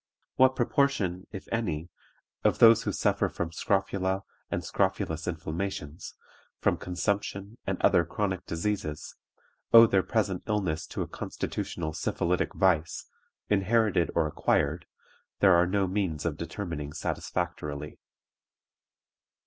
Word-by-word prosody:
What 130 0 +5
proportion, 120 -8 +1
if 95 - -8
any, 90 -8 -2 0.5
of - - +3
those 115 -1 +7
who - - -2
suffer - - +1
from 85 -1 -4
scrofula 95 +2 0 0.3
and - - -3
scrofulous 80 0 -1
inflammations, 80 -1 -4 0.4
from - - +2
consumption 100 +3 -3
and - - -1
other - - +5
chronic 95 +1 -2
diseases, 85 -3 -3 0.6
owe 115 0 +10
their 100 -4 +3
present 95 -1 -1
illness 95 -7 -1
to - - -3
a - - -7
constitutional 80 0 -4
syphilitic 85 +2 -1
vice, 85 -4 +1 0.4
inherited 105 -2 +2
or 85 - +3
acquired, 75 +2 0 0.5
there 95 -2 +6
are 85 +1 +4
no 100 +1 +1
means 90 -5 -2
of 80 -3 0
determining 85 -3 -5
satisfactorily." 75 -4 -4
90 Hz, 115 wpm, -28 LUFS, 80-100 Hz, 0.6 s, owe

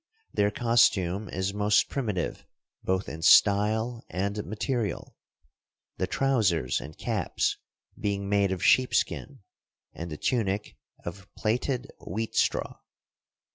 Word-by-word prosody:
Their 105 - +3
costume 105 -4 +2
is 95 +2 -2
most 105 0 +3
primitive 105 -10 -3 0.4
both 95 0 0
in 80 - -7
style 110 +6 +4
and 100 +3 -2
material; 110 0 -3 0.8
the - - -1
trousers 105 - +1
and 75 +2 -10
caps - - -1 0.4
being 100 -1 -2
made 100 -1 +2
of 95 -3 -3
sheepskin 130 +1 +2 0.5
and 85 +1 -6
the 75 - -5
tunic 105 - -1 0.3
of 95 +3 -8
plaited 125 +4 -1
wheat 110 +5 -4
straw. - - 0
105 Hz, 110 wpm, -27 LUFS, 95-115 Hz, 0.8 s, style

